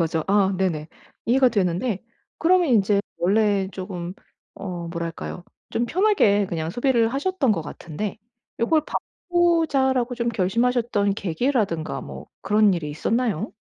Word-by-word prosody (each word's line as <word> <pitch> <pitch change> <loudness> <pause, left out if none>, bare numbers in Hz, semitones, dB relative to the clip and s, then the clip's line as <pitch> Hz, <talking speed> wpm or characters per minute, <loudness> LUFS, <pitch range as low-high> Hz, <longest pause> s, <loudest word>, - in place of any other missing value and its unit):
거죠. 160 -1 0
아 195 -1 +3
네네. 165 -5 -1 0.4
이해가 255 +2 +5
되는데 195 +1 0 0.4
그러면 355 0 +3
인제 205 -4 +3 0.2
원래 200 +1 +2
쪼금 185 -2 -6 0.4
어 175 -3 -6
뭐랄까요? 170 +1 -5 0.3
좀 235 - 0
편하게 330 - +3
그냥 165 -2 -3
소비를 240 0 +2
하셨던 285 -3 +1
것 180 - -1
같은데 170 +6 -6 0.4
'요걸 310 +7 +3 0.5
바꾸자.'라고 285 -8 +2
좀 235 -1 -1
결심하셨던 225 0 +1
계기라든가 200 - -1
뭐 - - -9
그런 210 0 +4
일이 165 -4 -3
있었나요? 220 +5 -1
210 Hz, 300 characters per minute, -23 LUFS, 180-250 Hz, 0.5 s, 이해가